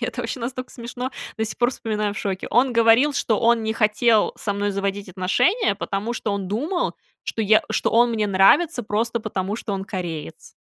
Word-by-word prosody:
и -, -, -1 dB
это 245 Hz, -, -4 dB
вообще 235 Hz, +2 st, -4 dB
настолько 255 Hz, +2 st, -5 dB
смешно, 245 Hz, +2 st, -6 dB, 0.3 s
до 220 Hz, -, +1 dB
сих 220 Hz, -, -5 dB
пор 240 Hz, 0 st, +2 dB
вспоминаю 215 Hz, -4 st, -2 dB
в 205 Hz, -, -6 dB
шоке, 190 Hz, -2 st, -3 dB
он 250 Hz, +2 st, +3 dB
говорил, 230 Hz, +5 st, +4 dB
что 220 Hz, -5 st, 0 dB
он 235 Hz, -1 st, +3 dB
не 220 Hz, 0 st, -1 dB
хотел 220 Hz, 0 st, +2 dB
со 205 Hz, -, -2 dB
мной 205 Hz, 0 st, -1 dB
заводить 200 Hz, 0 st, -3 dB
отношения, 200 Hz, -, +1 dB
потому 205 Hz, +3 st, -3 dB
что 210 Hz, -, -3 dB
он 195 Hz, -2 st, -3 dB
думал, 305 Hz, -, -1 dB, 0.3 s
что -, -, -4 dB
я 215 Hz, 0 st, +4 dB
что -, -, 0 dB
он 240 Hz, +1 st, +5 dB
мне 215 Hz, -2 st, 0 dB
нравится 225 Hz, -, +4 dB
просто 225 Hz, +2 st, -1 dB
потому, 200 Hz, -2 st, -3 dB
что 220 Hz, -2 st, -5 dB
он 195 Hz, 0 st, -4 dB
кореец. 170 Hz, -, -6 dB
220 Hz, 200 wpm, -22 LUFS, 200-240 Hz, 0.3 s, он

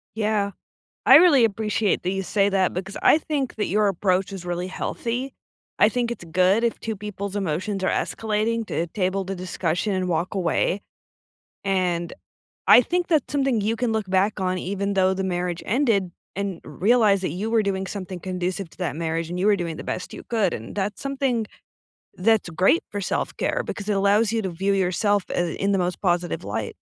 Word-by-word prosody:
Yeah. 210 Hz, -2 st, 0 dB, 0.5 s
I -, -, +9 dB
really 305 Hz, -8 st, +7 dB
appreciate 215 Hz, -1 st, 0 dB
that 185 Hz, -, 0 dB
you 195 Hz, -, -1 dB
say 200 Hz, +1 st, +2 dB
that, 190 Hz, -2 st, +1 dB
because 190 Hz, +2 st, -5 dB
I -, -, +6 dB
think 290 Hz, -4 st, -3 dB
that 210 Hz, -, -1 dB
your 210 Hz, +1 st, +2 dB
approach 190 Hz, +1 st, +1 dB
is 190 Hz, -2 st, -7 dB
really 175 Hz, +1 st, -2 dB
healthy. 245 Hz, +7 st, -3 dB, 0.5 s
I 210 Hz, -, +6 dB
think 240 Hz, +1 st, -1 dB
it's 235 Hz, -, -6 dB
good 185 Hz, +6 st, +3 dB
if 235 Hz, -, 0 dB
two 220 Hz, -1 st, -4 dB
people's 200 Hz, -1 st, -6 dB
emotions 190 Hz, +1 st, -2 dB
are -, -, +2 dB
escalating 220 Hz, +1 st, -1 dB
to 165 Hz, -, -1 dB
table 190 Hz, +1 st, -1 dB
the 195 Hz, +1 st, -4 dB
discussion 185 Hz, +2 st, -2 dB
and 185 Hz, -1 st, -1 dB
walk 175 Hz, +3 st, -1 dB
away, 185 Hz, +2 st, 0 dB, 0.8 s
and 180 Hz, -3 st, 0 dB, 0.5 s
I -, -, +9 dB
think 350 Hz, +7 st, -1 dB
that's 315 Hz, -6 st, +1 dB
something 270 Hz, -5 st, +1 dB
you 220 Hz, +3 st, 0 dB
can 240 Hz, -1 st, 0 dB
look 215 Hz, -3 st, -2 dB
back 195 Hz, +2 st, +2 dB
on 185 Hz, 0 st, 0 dB
even 200 Hz, +2 st, -2 dB
though 190 Hz, 0 st, +3 dB
the 190 Hz, -, -2 dB
marriage 180 Hz, -2 st, -2 dB
ended, 220 Hz, -6 st, +1 dB, 0.2 s
and 195 Hz, -3 st, -3 dB
realize 200 Hz, -, +3 dB
that 185 Hz, -, -2 dB
you 205 Hz, +5 st, -3 dB
were 225 Hz, -1 st, +3 dB
doing 190 Hz, -1 st, -1 dB
something 185 Hz, -2 st, -6 dB
conducive 185 Hz, 0 st, -3 dB
to -, -, -21 dB
that 175 Hz, -6 st, -2 dB
marriage 165 Hz, 0 st, -2 dB
and 180 Hz, -, -3 dB
you 190 Hz, -, +1 dB
were 210 Hz, -, +5 dB
doing 170 Hz, -3 st, -4 dB
the -, -, -8 dB
best 180 Hz, -, -4 dB
you -, -, -9 dB
could, 215 Hz, -6 st, +1 dB
and 110 Hz, -, -7 dB
that's 205 Hz, 0 st, -2 dB
something 270 Hz, -5 st, -1 dB, 0.7 s
that's 215 Hz, 0 st, +2 dB
great 185 Hz, -, +3 dB
for 205 Hz, -, -3 dB
self-care 190 Hz, -, -1 dB
because 205 Hz, -1 st, -5 dB
it 210 Hz, -, +2 dB
allows 200 Hz, +2 st, +3 dB
you 225 Hz, -1 st, 0 dB
to 190 Hz, -, -2 dB
view 195 Hz, +4 st, 0 dB
yourself, 195 Hz, +2 st, +1 dB
uh, 175 Hz, -2 st, 0 dB
in 200 Hz, +1 st, +1 dB
the 195 Hz, -, +2 dB
most 180 Hz, 0 st, -1 dB
positive 175 Hz, -, 0 dB
light. 105 Hz, +1 st, -4 dB
195 Hz, 195 wpm, -24 LUFS, 180-220 Hz, 0.8 s, I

